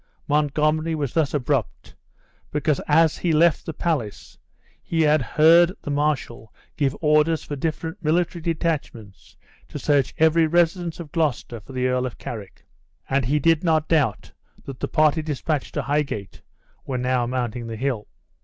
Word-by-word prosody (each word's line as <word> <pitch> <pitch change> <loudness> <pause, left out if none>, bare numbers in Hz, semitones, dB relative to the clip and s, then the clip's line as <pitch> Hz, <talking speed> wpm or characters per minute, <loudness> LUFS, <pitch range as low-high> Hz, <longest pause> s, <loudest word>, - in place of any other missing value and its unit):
Montgomery 150 +2 +1
was 145 -5 -3
thus 160 -4 +1
abrupt, 140 -3 -2 0.6
because 150 -1 0
as 160 +1 +3
he 175 - 0
left 160 +1 +3
the - - -2
palace 145 -11 -3 0.5
he 165 -1 0
had 150 -1 +3
heard 165 +7 +5
the 145 - -4
marshal 140 -6 -2 0.2
give 140 -2 0
orders 155 +1 +3
for 145 - -5
different 160 +5 -4
military 170 +2 0
detachments 155 - -4 0.3
to - - -7
search 140 -3 +1
every 160 +1 +4
residence 170 +1 +1
of 160 -4 -8
Gloucester 145 -7 -1
for 105 +6 -14
the 125 0 -1
Earl 125 0 +1
of 125 - -9
Carrick; 105 -5 -9 0.5
and 135 -2 +2
he 145 +5 +1
did 165 +3 +2
not 160 -3 +2
doubt 145 - 0 0.3
that 135 -2 -8
the - - -2
party 155 0 +2
dispatched 150 -1 -3
to 145 - -1
Highgate 140 -8 -2 0.4
were 130 - -3
now 125 -1 0
mounting 120 -2 -3
the 115 - -5
hill. 125 -4 -2
150 Hz, 155 wpm, -23 LUFS, 130-160 Hz, 0.6 s, heard